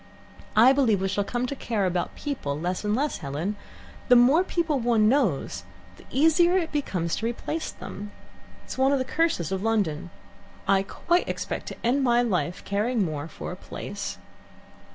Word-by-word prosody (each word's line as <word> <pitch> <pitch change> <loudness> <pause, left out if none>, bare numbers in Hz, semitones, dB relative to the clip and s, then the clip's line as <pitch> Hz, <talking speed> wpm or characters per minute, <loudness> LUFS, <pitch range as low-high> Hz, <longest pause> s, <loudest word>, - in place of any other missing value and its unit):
"I 240 +5 +7
believe 245 -8 +3
we 190 - 0
shall 200 +1 0
come 240 +4 -2
to 280 - -3
care 220 -6 -1
about 180 -1 -1
people 150 - -3
less 180 +4 -2
and 210 0 +1
less, 285 +4 -1
Helen. 150 +9 -3 0.5
The 250 - +7
more 265 +9 +6
people 330 -6 0
one 230 -3 +3
knows 225 - +1 0.3
the - - -16
easier 325 +6 +4
it 335 -3 -1
becomes 180 - -1
to 225 - -3
replace 305 +7 -3
them. 205 +1 -8 0.5
It's - - -7
one 265 +1 +4
of 280 - +3
the 260 - -1
curses 280 - 0
of 190 -1 -1
London. 195 -7 0 0.6
I 195 0 +4
quite 345 - 0
expect - - -4
to - - -6
end 265 +4 +2
my 240 -1 +4
life 180 -7 -1
caring 210 +2 0
most 155 -1 -5
for - - -6
a - - -5
place." - - -6
225 Hz, 175 wpm, -26 LUFS, 190-275 Hz, 0.6 s, I